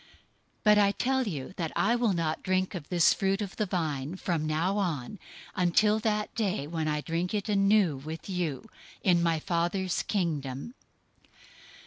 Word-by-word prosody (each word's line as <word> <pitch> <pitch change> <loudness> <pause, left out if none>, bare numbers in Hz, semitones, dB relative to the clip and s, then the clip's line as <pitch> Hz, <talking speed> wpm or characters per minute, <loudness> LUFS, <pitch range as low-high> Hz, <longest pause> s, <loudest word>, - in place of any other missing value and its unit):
026:029 - - -25 0.6
But 210 -1 +6
I 200 -1 +4
tell 260 +1 0
you 145 -5 -5
that 165 -4 -2
I 230 +4 +3
will 235 -4 +2
not 165 -2 -1
drink 185 0 0
of 170 -6 -7
this 175 -3 +5
fruit 195 0 0
of 200 -3 -5
the 215 - 0
vine 155 -4 -2
from 170 -4 -2
now 170 +6 0
on, 170 -1 -3 0.4
until 210 +4 +3
that 210 -1 -1
day 205 -9 -1
when 160 0 -3
I 150 -1 0
drink 170 +5 -2
it 205 0 -2
anew 195 -6 +3
with 155 +4 -7
you 180 -1 -3 0.4
in 175 -3 +4
my 165 -1 +2
Father's 175 +3 -1
Kingdom." 155 - -2
180 Hz, 165 wpm, -29 LUFS, 160-205 Hz, 0.6 s, But